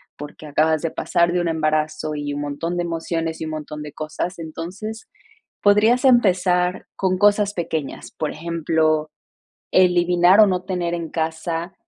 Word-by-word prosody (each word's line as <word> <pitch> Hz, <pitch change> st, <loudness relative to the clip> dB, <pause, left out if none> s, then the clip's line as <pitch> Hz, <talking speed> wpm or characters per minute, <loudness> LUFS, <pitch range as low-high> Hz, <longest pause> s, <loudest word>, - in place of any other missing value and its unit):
porque 150 Hz, +1 st, -10 dB
acabas 155 Hz, +2 st, +1 dB
de 165 Hz, -, -1 dB
pasar 170 Hz, -1 st, +1 dB
de 180 Hz, -, +1 dB
un 175 Hz, -, -1 dB
embarazo 155 Hz, -1 st, -1 dB
y 145 Hz, -1 st, -4 dB
un 145 Hz, -, -3 dB
montón 145 Hz, +4 st, -3 dB
de 175 Hz, -, 0 dB
emociones 165 Hz, -1 st, -3 dB
y -, -, -2 dB
un 155 Hz, -, -5 dB
montón 150 Hz, -1 st, -6 dB
de 150 Hz, -1 st, -8 dB
cosas. 155 Hz, +5 st, -4 dB
Entonces, 180 Hz, +7 st, -7 dB, 0.5 s
podrías 215 Hz, +5 st, +4 dB
empezar 185 Hz, -6 st, +3 dB
con 185 Hz, -1 st, 0 dB
cosas 205 Hz, 0 st, +3 dB
pequeñas, 165 Hz, -6 st, -4 dB
por 155 Hz, -, -3 dB
ejemplo, 155 Hz, -1 st, 0 dB, 0.6 s
eliminar 180 Hz, +1 st, +4 dB
o 215 Hz, -, +9 dB
no 185 Hz, -3 st, 0 dB
tener 180 Hz, -2 st, -2 dB
en 170 Hz, -2 st, -4 dB
casa, 165 Hz, +2 st, -3 dB
170 Hz, 155 wpm, -21 LUFS, 155-180 Hz, 0.6 s, o